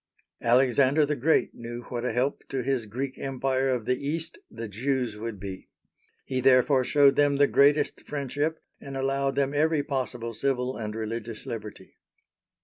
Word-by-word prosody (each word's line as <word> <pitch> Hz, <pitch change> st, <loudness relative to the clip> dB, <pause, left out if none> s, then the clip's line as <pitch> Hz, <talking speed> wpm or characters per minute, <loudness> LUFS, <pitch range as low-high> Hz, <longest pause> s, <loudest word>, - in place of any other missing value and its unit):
Alexander 130 Hz, +4 st, +4 dB
the 150 Hz, +1 st, -1 dB
Great 150 Hz, +5 st, +2 dB
knew 120 Hz, +1 st, -7 dB
what 120 Hz, -1 st, -3 dB
a 125 Hz, -, 0 dB
help 125 Hz, +5 st, 0 dB
to 135 Hz, -2 st, -2 dB
his 130 Hz, -4 st, -1 dB
Greek 130 Hz, +5 st, -4 dB
Empire 135 Hz, 0 st, 0 dB
of 125 Hz, -4 st, -1 dB
the 125 Hz, +2 st, -1 dB
East 160 Hz, +3 st, -3 dB
the 115 Hz, 0 st, -6 dB
Jews 125 Hz, +2 st, -1 dB
would 110 Hz, -1 st, -6 dB
be. 95 Hz, -1 st, -8 dB, 0.6 s
He 130 Hz, -1 st, -2 dB
therefore 130 Hz, +1 st, +5 dB
showed 140 Hz, +1 st, +5 dB
them 145 Hz, -1 st, +3 dB
the 145 Hz, +1 st, +5 dB
greatest 140 Hz, +4 st, +3 dB
friendship, 145 Hz, +2 st, -2 dB, 0.2 s
and 135 Hz, -1 st, -7 dB
allowed 135 Hz, 0 st, 0 dB
them 140 Hz, 0 st, +1 dB
every 155 Hz, 0 st, +2 dB
possible 125 Hz, -4 st, -3 dB
civil 130 Hz, +1 st, -1 dB
and 105 Hz, -1 st, -5 dB
religious 115 Hz, +1 st, -5 dB
liberty. 110 Hz, -6 st, -8 dB
130 Hz, 160 wpm, -27 LUFS, 115-140 Hz, 0.6 s, therefore